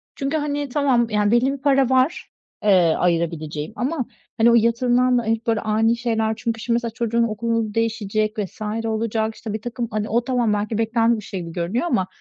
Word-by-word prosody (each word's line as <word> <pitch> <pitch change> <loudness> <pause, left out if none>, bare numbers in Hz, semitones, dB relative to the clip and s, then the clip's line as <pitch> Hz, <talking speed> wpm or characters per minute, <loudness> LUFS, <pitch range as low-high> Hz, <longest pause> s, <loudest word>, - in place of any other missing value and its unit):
Çünkü, 280 +3 -1
hani, 290 -1 -2
tamam, 250 -4 +2
yani, 210 0 +1
belli 255 +3 +3
bir - - -5
para 275 -2 +3
var, 260 +6 +1 0.3
eee, 180 -6 +4
ayırabileceğim 165 -1 -1
ama, 260 0 -2 0.3
hani, 230 +1 +5
o - - +5
yatırımdan 245 +2 +3
da 240 - 0
hep 225 +1 -2
böyle 225 -2 +2
ani 225 +2 +1
şeyler 225 -2 0
çünkü, 230 -1 -3
şimdi, 235 0 0
mesela 235 -1 -2
çocuğun 235 0 0
okulu 230 -1 -1
değişecek 215 -1 -1
vs. 210 +3 -5 0.2
olacak. 220 0 -1
İşte, 215 -2 -6
birtakım 235 +2 -4
hani, 215 0 -2
o 235 +2 +1
tamam, 245 -5 +1
belki 210 +1 -2
beklenen 230 +1 +2
bir - - -10
şey 195 -1 -6
gibi 165 - -7
görünüyor 180 - -2
ama 195 - +1
230 Hz, 190 wpm, -22 LUFS, 215-245 Hz, 0.3 s, hani